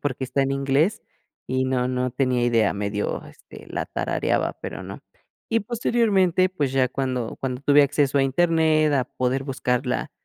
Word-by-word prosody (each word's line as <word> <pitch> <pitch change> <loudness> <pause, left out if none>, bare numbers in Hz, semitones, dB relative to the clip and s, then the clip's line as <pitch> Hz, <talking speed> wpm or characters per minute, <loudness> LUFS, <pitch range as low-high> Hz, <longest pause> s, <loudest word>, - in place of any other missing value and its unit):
porque, 130 -2 -2
está 140 - -1
en 135 - -1
inglés 140 +10 +1 0.4
y 130 0 0
no 125 -1 0
no 125 0 -1
tenía 125 -1 0
idea, 115 -3 +2
medio, 100 0 -3
este, - - -14
la - - -3
tarareaba, - - -1
pero, - - -6
no. - - -8 0.5
Y 230 - +2
posteriormente, 205 -5 +2
pues, 145 -8 -2
ya 130 -1 +2
cuando 130 -3 -3
cuando 130 -1 -3
tuve 145 +1 +5
acceso 145 0 +1
a 135 - +4
Internet, 155 +1 +2
a 130 - +1
poder 130 +2 -2
buscar 125 -2 -1
la - - -2
135 Hz, 170 wpm, -23 LUFS, 125-155 Hz, 0.5 s, tuve